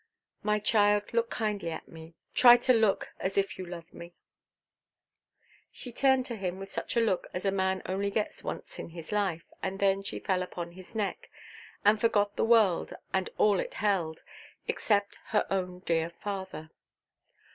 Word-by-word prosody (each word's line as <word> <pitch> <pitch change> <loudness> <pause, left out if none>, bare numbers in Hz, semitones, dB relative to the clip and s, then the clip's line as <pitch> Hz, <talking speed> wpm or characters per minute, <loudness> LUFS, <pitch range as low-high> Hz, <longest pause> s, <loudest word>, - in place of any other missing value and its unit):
"My 210 0 +2
child, 205 0 +2
look 230 0 +2
kindly 210 -6 -2
at 160 - -6
me; 160 0 -12 0.2
try 245 -1 +9
to 255 +1 +3
look 220 -4 +2
as 190 +1 -2
if 195 -1 0
you 185 - -5
loved 170 -1 -9
me." 170 0 -11 1.6
She 245 - -7
turned 265 +1 +3
to 240 - -4
him 185 -2 -3
with 195 0 -8
such - - -3
a - - +6
look 210 -6 +1
as 180 - -3
a 195 - +3
man 190 -1 0
only 195 +2 -1
gets 210 +1 -2
once - - -6
in - - -6
his 165 +1 -9
life, 195 -6 0 0.2
and 190 0 -2
then 195 0 +3
she 195 - -5
fell 185 -2 0
upon 175 -1 -5
his 185 +5 -14
neck, 210 -3 -2 0.6
and 210 +1 +5
forgot 205 -3 +2
the - - +1
world 220 -6 +4 0.2
and 190 -1 +1
all 205 -3 +4
it - - -4
held, 180 -7 0 0.4
except 200 -2 0
her 210 - +2
own 180 -2 -2
dear 165 -2 +1
father. 190 -3 -6
195 Hz, 175 wpm, -30 LUFS, 180-210 Hz, 1.6 s, try